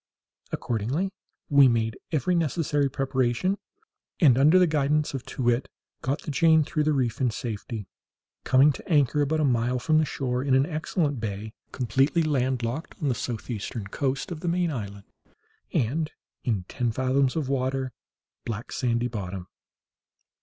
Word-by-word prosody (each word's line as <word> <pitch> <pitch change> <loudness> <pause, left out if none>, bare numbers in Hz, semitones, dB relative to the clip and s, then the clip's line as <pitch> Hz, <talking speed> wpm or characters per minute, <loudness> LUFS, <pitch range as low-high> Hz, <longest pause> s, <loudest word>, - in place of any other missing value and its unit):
Accordingly 125 - -1 0.4
we 140 -2 +7
made 115 -2 0
every 170 +3 +1
necessary 150 -3 +1
preparation, 135 - 0 0.6
and, 140 -9 +6
under 150 +7 +6
the 185 - +6
guidance 150 -1 +1
of 135 -3 -4
Too 130 - -4
wit, 120 +2 +1 0.3
got 135 +4 -2
the 155 - -4
Jane 160 +1 +5
through 155 0 -1
the 155 - +3
reef 130 -4 0
in 125 - +3
safety, 110 -2 -5 0.6
coming 135 +3 +5
to 135 - -10
anchor 145 -2 +3
about 155 +2 +1
a - - +3
mile 125 -1 +1
from 155 +5 +2
the 155 - +2
shore, 125 -3 -2
in 135 -2 +3
an 135 +1 +4
excellent 155 -3 -1
bay, 105 0 -4 0.2
completely 135 +7 +2
landlocked, 130 -1 -1
on 150 - 0
the - - +2
southeastern 115 -3 -4
coast 135 - -2
of 165 - -4
the 175 - -5
main 175 0 +1
island, 100 -6 -5 0.7
and 150 +7 0 0.3
in 105 -7 0
ten 120 +6 -2
fathoms 130 +2 +1
of 155 -5 -1
water, 130 -1 -1 0.5
black 115 0 -5
sandy 120 -1 0
bottom. 95 -5 -6
135 Hz, 155 wpm, -26 LUFS, 120-150 Hz, 0.7 s, we